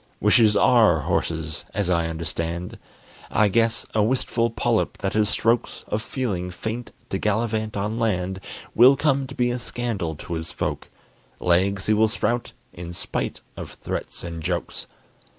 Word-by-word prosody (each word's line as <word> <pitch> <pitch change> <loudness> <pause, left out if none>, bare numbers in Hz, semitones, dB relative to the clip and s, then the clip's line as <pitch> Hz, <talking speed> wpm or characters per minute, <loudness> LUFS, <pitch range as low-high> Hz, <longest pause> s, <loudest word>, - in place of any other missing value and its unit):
Wishes 110 -3 +5
are 105 -9 +5
horses, 80 -2 -2
as 100 -3 0
I 85 -2 +2
understand. 85 +2 -3 0.5
I 105 -1 +3
guess 115 +2 +2
a 110 - +3
wistful 115 0 +1
polyp 115 0 0
that 95 -2 -2
has 105 -1 +3
strokes 115 +1 +1
Of 105 - -1
feeling 105 -8 -2
faint 110 +7 -5 0.2
to 95 - -1
gallivant 110 0 0
on 105 +3 -2
land 95 -4 0 0.3
Will 125 +4 +8
come 140 -2 +2
to 135 - -9
be 120 0 +1
a 125 - -2
scandal 115 -10 -3
to 85 +3 -7
his 80 0 -3
folk; - - -3 0.5
Legs 95 +3 +2
he 110 - +3
will 110 +1 +4
sprout, 120 +2 -1 0.2
in 85 0 -7
spite - - -3
of - - -7
threats - - -5
and 85 -1 -5
jokes. 85 +2 -3
105 Hz, 155 wpm, -24 LUFS, 90-115 Hz, 0.5 s, Will